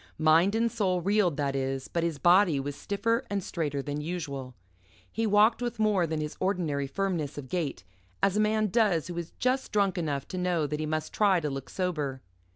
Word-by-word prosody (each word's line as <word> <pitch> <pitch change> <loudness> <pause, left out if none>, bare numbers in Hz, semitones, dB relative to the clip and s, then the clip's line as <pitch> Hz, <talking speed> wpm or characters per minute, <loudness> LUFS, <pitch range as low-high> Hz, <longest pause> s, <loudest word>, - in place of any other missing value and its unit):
Mind 160 +6 +4
and 230 +1 +1
soul 190 -6 0
reeled, 190 -3 +2
that 140 -2 -1
is, 135 0 -2
but 170 - -1
his 165 -3 -1
body 175 0 +4
was 140 +1 -4
stiffer 230 - -1
and 200 -1 -2
straighter 145 -5 -2
than 145 +1 -3
usual. 140 -6 -5 0.6
He 225 0 -1
walked 215 +3 +4
with 240 -1 -3
more 210 -5 +2
than 160 -1 -2
his 150 0 -4
ordinary 170 -8 -1
firmness 170 -3 -2
of 135 -3 -7
gait, 150 - -2 0.4
as 195 0 +3
a - - +2
man 215 0 +2
does 185 -7 +2
who 175 - -5
is 170 -1 -7
just 255 +1 0
drunk 200 -3 +1
enough 145 -4 -2
to 185 - -4
know 175 -3 +1
that 150 +1 -3
he 155 - -2
must 155 0 -3
try 200 -4 +3
to 150 -3 -3
look 135 -2 -6
sober. 150 -8 -2
175 Hz, 205 wpm, -28 LUFS, 145-200 Hz, 0.6 s, Mind